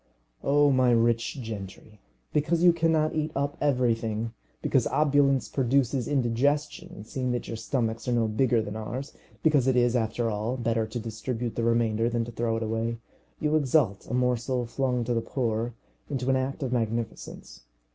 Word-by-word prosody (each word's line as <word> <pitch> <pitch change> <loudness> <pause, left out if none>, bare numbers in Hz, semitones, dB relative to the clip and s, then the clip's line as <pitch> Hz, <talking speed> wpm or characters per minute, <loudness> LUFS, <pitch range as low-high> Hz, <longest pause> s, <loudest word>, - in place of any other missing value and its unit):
O 145 0 +4
my 130 -1 +4
rich 115 +2 +2
gentry, 105 -1 -8 0.3
because 165 +3 +1
you 175 -1 +7
cannot 160 -2 +2
eat 155 0 -1
up 140 +1 -1
everything, 115 -5 0 0.3
because - - +2
opulence 140 -3 +3
produces 130 -1 +1
indigestion 145 - -1
seeing 125 +2 -2
that 120 - -3
your - - -4
stomachs 115 -1 -2
are - - +1
no 115 -2 +2
bigger 115 +1 +2
than 105 0 -6
ours, 120 +6 -5 0.3
because 145 -5 +3
it 130 - +3
is, 120 0 +3
after 115 0 0
all, 110 +5 -2
better 115 -2 0
to 110 +2 -4
distribute 115 +1 -4
the 115 - -1
remainder 115 -1 +2
than 120 -1 -1
to 120 - -7
throw 115 -1 -1
it 115 - -2
away, 115 +1 -2 0.4
you 150 0 +1
exalt 130 -8 +2
a - - -4
morsel 125 0 0
flung 125 0 -1
to 120 +1 -1
the 115 - +1
poor 115 -2 -2 0.3
into 135 -2 0
an - - +3
act 135 +3 -2
of 130 -1 -2
magnificence. 115 -1 -4
120 Hz, 170 wpm, -27 LUFS, 115-140 Hz, 0.4 s, you